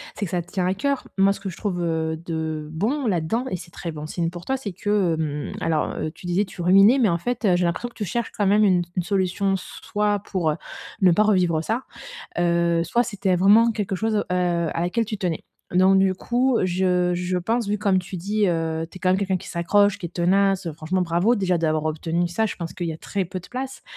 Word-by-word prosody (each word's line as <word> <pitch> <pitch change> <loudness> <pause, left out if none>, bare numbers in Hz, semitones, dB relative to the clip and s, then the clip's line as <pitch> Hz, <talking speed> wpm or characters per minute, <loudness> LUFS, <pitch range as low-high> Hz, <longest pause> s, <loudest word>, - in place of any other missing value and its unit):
C'est 210 - -4
que 180 - -3
ça 175 -1 0
te 175 - -15
tient 185 -2 -1
à 185 - +2
cœur. 280 +6 -1
Moi, 195 +1 +4
ce - - -11
que 195 - -4
je 170 - -9
trouve, 180 -4 -2
heu, 160 -1 -1
de 160 -2 -3
bon 235 - -1
là-dedans 190 +6 0
et 185 - -2
c'est 170 -1 -12
très 170 - -6
bon 150 0 -7
signe 165 0 -2
pour 175 0 -9
toi, 265 - 0
c'est 225 -7 -5
que, 195 -2 +1
hem, 150 -2 -3
alors, 160 -2 0
heu, 155 - -3
tu 175 +2 -11
disais 190 +4 +1
tu 185 - -9
ruminais, 195 +8 +6
mais 230 -7 +3
en 170 - +1
fait, 245 +6 -3
heu, 185 -4 +4
j'ai 175 - +1
l'impression 175 +8 -2
que - - -24
tu 210 - -3
cherches 235 +5 -2
quand 205 -2 +2
même 210 +2 +4
une 185 -3 +4
s - - -4
une 180 - 0
solution 195 +1 0
s 185 - -6 0.2
soit 205 -1 0
pour, 180 -5 -1
heu, - - -2 0.5
ne 185 -2 +6
pas 210 +5 +4
revivre 180 -6 +2
ça, 225 +9 -2 0.6
heu, 170 -1 +2
soit 240 +7 +1
c'était 195 -4 0
vraiment 210 +5 +5
quelque 205 -3 -2
chose, 220 +3 0
heu, - - +1
à 175 -2 0
laquelle 205 +7 0
tu 215 0 -4
tenais. 175 -6 -2 0.3
Donc 190 +1 +5
du 190 -1 +3
coup, 245 +5 +1
je 180 -1 +1
je 180 +1 -1
pense, 225 +4 -1
vu 210 - +1
comme 200 -3 +2
tu 185 0 -6
dis, 205 +4 0
heu, 165 -1 -1
tu - - -14
es - - -6
quand 185 - +2
même 185 - +3
quelqu'un 190 -2 0
qui - - -9
s'accroche, 200 +4 +2
qui 175 - -5
est - - -7
tenace. 185 0 +1
Franchement, 170 +4 -1
bravo, 175 +7 +2
déjà 185 -4 +1
d'avoir 155 -1 0
obtenu 165 +2 -1
ça. 220 +6 0
Je - - -5
pense 170 -1 -5
qu'il 175 - -4
y 165 - -2
a - - -7
très 190 +2 -3
peu 185 +1 -5
de 180 - -13
place. 260 +1 -6
185 Hz, 255 wpm, -23 LUFS, 170-205 Hz, 0.6 s, ruminais